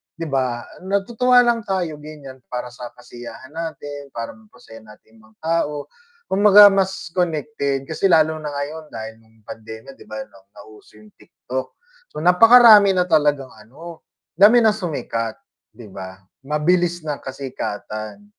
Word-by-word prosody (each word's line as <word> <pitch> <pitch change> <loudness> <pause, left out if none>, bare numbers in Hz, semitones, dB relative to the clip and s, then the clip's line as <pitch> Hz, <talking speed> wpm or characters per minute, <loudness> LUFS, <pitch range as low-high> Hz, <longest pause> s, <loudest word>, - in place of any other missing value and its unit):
'di 165 - -6
ba 125 -3 -1 0.2
natutuwa 235 +5 +3
lang 235 -3 0
tayo 175 -6 -2
ganiyan, 145 -3 -11
para 125 0 -6
sa 125 0 -10
kasiyahan 125 +2 -12
natin, 145 -3 -7
para 115 0 -5
mapasaya 210 - -16
natin 110 +1 -19
mga 110 0 -23
tao, 150 -3 -2 0.4
kumbaga 205 +1 +7
mas 190 -2 -2
connected 155 -5 -2
kasi 160 +7 -1
lalo 160 -3 +3
na 155 - -7
ngayon 150 +2 -6
dahil 110 -2 -9
nung 110 -1 -27
pandemya 110 +5 -11
'di - - -14
ba 110 0 -6
na 95 - -20 0.2
nauso 105 +1 -16
yung 105 0 -18
TikTok, 130 +1 -8 0.3
so 155 - -8
napakarami 210 +1 +7
na 180 - +3
talagang 145 -6 +1
ano 150 +10 -13 0.3
dami 215 +7 +5
ng 220 - +5
sumikat 145 - -4 0.4
'di 115 -3 -12
ba, 95 0 -9 0.2
mabilis 170 +4 0
na 150 -2 -4
kasikatan. 130 - -7
150 Hz, 145 wpm, -20 LUFS, 120-180 Hz, 0.4 s, kumbaga